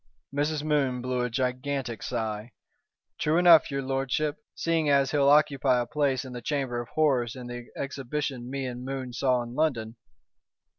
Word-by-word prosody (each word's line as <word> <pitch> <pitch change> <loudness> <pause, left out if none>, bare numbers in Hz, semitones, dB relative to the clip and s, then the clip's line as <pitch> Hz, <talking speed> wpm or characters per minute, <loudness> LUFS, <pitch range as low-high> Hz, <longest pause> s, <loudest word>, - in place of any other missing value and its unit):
Mrs. 150 +1 0
Moon 140 -5 +1
blew 125 -1 -1
a 125 - 0
gigantic 130 -1 -2
sigh. 110 -1 -3 0.7
"True 155 +2 +2
enough, 175 -3 +7
your 140 -1 -2
lordship, 135 +3 -1 0.2
seeing 165 -2 +1
as 140 -2 +3
he'll 140 -2 +4
occupy 140 -3 +4
a 120 - 0
place 140 0 0
in 130 - -8
the 120 - -6
Chamber 130 -3 -1
of 120 - -10
Horrors 130 -6 +2
in 125 -1 -8
the 120 0 -7
exhibition 135 -2 -4
me 135 0 -3
and 125 -1 -5
Moon 130 -2 -5
saw 125 -1 +1
in 120 0 -8
London. 125 -7 -1
135 Hz, 165 wpm, -27 LUFS, 125-145 Hz, 0.7 s, enough